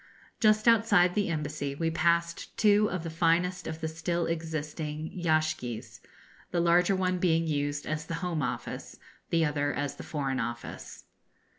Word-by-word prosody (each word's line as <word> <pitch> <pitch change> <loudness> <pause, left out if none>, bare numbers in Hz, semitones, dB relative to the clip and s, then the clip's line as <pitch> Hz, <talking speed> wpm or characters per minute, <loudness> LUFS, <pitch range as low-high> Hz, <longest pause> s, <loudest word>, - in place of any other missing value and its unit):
Just 215 0 +4
outside 205 -6 +5
the 205 -2 0
Embassy 150 -3 -3
we 165 +2 -1
passed 170 +1 0
two 210 0 +4
of 180 -2 -3
the 165 - -4
finest 170 +2 +1
of 160 0 -5
the 160 - -1
still 165 +2 -1
existing 155 -1 -4
yashgis, 155 -9 -1 0.5
the 175 - 0
larger 175 +2 +4
one 185 -1 0
being 165 -2 +2
used 145 -1 -1
as 155 0 -2
the 165 - -3
Home 170 -3 -1
Office, 120 -2 -4 0.3
the 165 -1 +3
other 145 -1 0
as 145 0 -3
the - - -7
Foreign 135 -4 -2
Office. 120 -1 -6
165 Hz, 155 wpm, -29 LUFS, 150-175 Hz, 0.5 s, outside